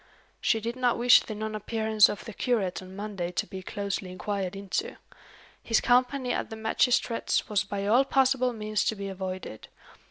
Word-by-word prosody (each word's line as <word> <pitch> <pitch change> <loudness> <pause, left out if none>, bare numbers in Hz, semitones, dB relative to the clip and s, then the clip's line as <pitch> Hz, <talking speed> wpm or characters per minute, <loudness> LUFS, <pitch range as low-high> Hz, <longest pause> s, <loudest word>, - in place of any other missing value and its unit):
"She 225 - +2
did 230 +2 -4
not 250 -2 +1
wish 245 +1 +7
the 215 - -7
non 215 +1 -4
appearance 220 0 +3
of 205 - -6
the 225 - -7
curate 205 -9 -1
on 185 0 -11
Monday 200 -4 -4
to - - -1
be 190 +2 -8
closely 200 -1 -4
inquired 190 0 -3
into. 200 - -3 0.7
His 225 - +2
company 250 +1 +2
at - - -3
the 220 - -6
magistrate's 230 +2 +1
was 210 -2 +1
by 200 -1 -4
all 235 +6 +5
possible 265 -2 +2
means 215 -2 -1
to 220 - +1
be 200 -1 -5
avoided. 185 - -6
215 Hz, 180 wpm, -27 LUFS, 195-240 Hz, 0.7 s, wish